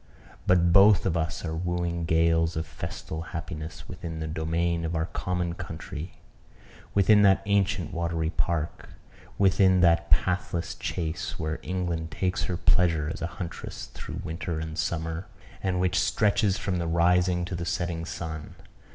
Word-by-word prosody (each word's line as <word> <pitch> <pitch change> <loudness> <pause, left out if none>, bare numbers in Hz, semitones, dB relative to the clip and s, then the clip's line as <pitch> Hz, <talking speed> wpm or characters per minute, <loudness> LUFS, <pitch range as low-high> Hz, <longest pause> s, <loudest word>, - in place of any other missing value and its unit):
But 85 -1 +4
both 100 +2 +7
of 90 -3 +1
us 80 0 -2
are 80 - -2
wooing 85 0 -1
gales 80 0 +3
of 80 - -2
festal 80 - -6 0.2
happiness 80 -1 -7
within 85 -3 -6
the 80 - -3
domain 85 +2 0
of 85 +1 -2
our 80 0 +1
common 90 -1 -2
country 80 0 -7 0.8
within 105 +1 +6
that 95 -1 +5
ancient 100 -4 +1
watery 85 -1 -1
park 85 -2 -2 0.5
within 95 -1 +4
that 85 -1 +4
pathless 85 +2 +1
chase 80 -2 -3
where 80 0 -3
England 85 -3 -2
takes 95 +2 -1
her 90 - -2
pleasure 85 -6 +2
as - - -9
a 85 - 0
huntress 85 -2 -6
through - - -6
winter 80 0 -3
and 80 0 -5
summer, 80 +2 -2 0.3
and 95 -2 0
which 90 -1 +2
stretches 100 +1 +2
from 90 -2 -1
the 85 - -1
rising 90 +1 +3
to 90 - -5
the 85 0 -3
setting 85 0 -2
sun. 80 -2 -6
85 Hz, 150 wpm, -27 LUFS, 80-90 Hz, 0.8 s, both